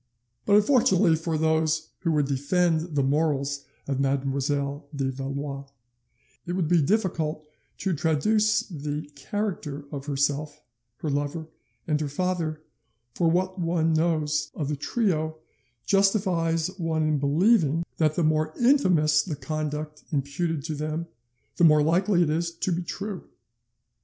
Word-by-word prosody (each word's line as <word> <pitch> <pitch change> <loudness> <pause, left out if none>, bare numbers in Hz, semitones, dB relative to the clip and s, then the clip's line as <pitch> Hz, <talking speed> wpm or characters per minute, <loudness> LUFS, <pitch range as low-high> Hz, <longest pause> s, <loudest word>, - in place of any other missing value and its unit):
But 205 - +5
unfortunately 205 - +4
for 160 0 -2
those 160 0 +1
who 170 - 0
would 150 -2 +2
defend 160 +4 0
the 140 - +2
morals 140 -1 0 0.2
of 135 -1 -1
Mademoiselle 140 +1 -1
de 135 -1 -1
Valois, 140 +1 -5 0.8
it 175 - -2
would 180 -3 0
be 170 0 +4
difficult 160 -4 0 0.3
to 190 - -1
traduce 210 +8 +2
the 150 -3 -5
character 150 -1 -4
of 140 -1 -6
herself, 145 +1 -1 0.4
her 155 - -2
lover, 145 +3 -2 0.4
and 150 -1 +1
her 150 - -1
father, 160 -1 -2 0.5
for 170 +3 +2
what 185 +3 0
one 165 -1 +1
knows 155 -2 +1
of 145 -3 -3
the 150 - 0
trio 160 - -1 0.5
justifies 185 -5 +2
one 160 -2 0
in 155 -1 +1
believing 165 +2 +3
that 155 -1 +2
the 175 - +1
more 155 0 +1
infamous 180 - +4
the 155 0 -4
conduct 150 0 -4
imputed 145 +2 -1
to 160 +1 -3
them, 155 +2 -3 0.5
the - - +2
more 150 -2 +6
likely 175 +3 +3
it 160 - 0
is 170 +2 0
to 170 +2 -3
be 175 +1 0
true. 195 +2 -5
155 Hz, 140 wpm, -26 LUFS, 145-175 Hz, 0.8 s, more